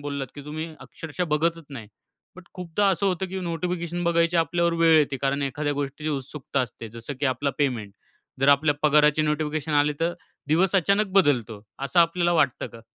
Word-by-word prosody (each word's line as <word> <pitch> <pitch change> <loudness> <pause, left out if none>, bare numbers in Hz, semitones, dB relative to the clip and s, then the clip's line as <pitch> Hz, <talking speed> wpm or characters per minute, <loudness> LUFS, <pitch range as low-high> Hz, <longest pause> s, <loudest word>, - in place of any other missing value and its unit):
बोललात 140 -2 -4
की 145 -1 -10
तुम्ही 155 +2 -5
अक्षरशः 165 +2 -5
बघतच 165 +1 0
नाही. 120 -7 -8 0.5
बट 185 - -12
खूपदा 180 +2 -1
असं 195 +2 0
होतं 190 0 0
की 190 - -5
नोटिफिकेशन 175 0 -3
बघायची 170 0 +2
आपल्यावर 170 +1 +1
वेळ 165 -1 +6
येते 145 -2 +1
कारण 140 +2 -1
एखाद्या 145 +2 -2
गोष्टीची 145 +2 -4
उत्सुकता 135 0 -3
असते, 115 -2 -5
जसं 115 +5 -8
की 145 - +2
आपला 130 +2 0
पेमेंट. 120 -8 -1 0.5
जर 135 - +3
आपल्या 145 +1 +4
पगाराची 150 0 +4
नोटिफिकेशन 150 0 -1
आली 145 0 +3
तर 170 +1 +1 0.4
दिवस 175 +5 +2
अचानक 200 +4 +2
बदलतो. 125 - +2 0.2
असं 140 +6 +2
आपल्याला 170 +1 +2
वाटतं 140 -7 +1
का? 115 - -13
150 Hz, 175 wpm, -25 LUFS, 140-170 Hz, 0.5 s, वेळ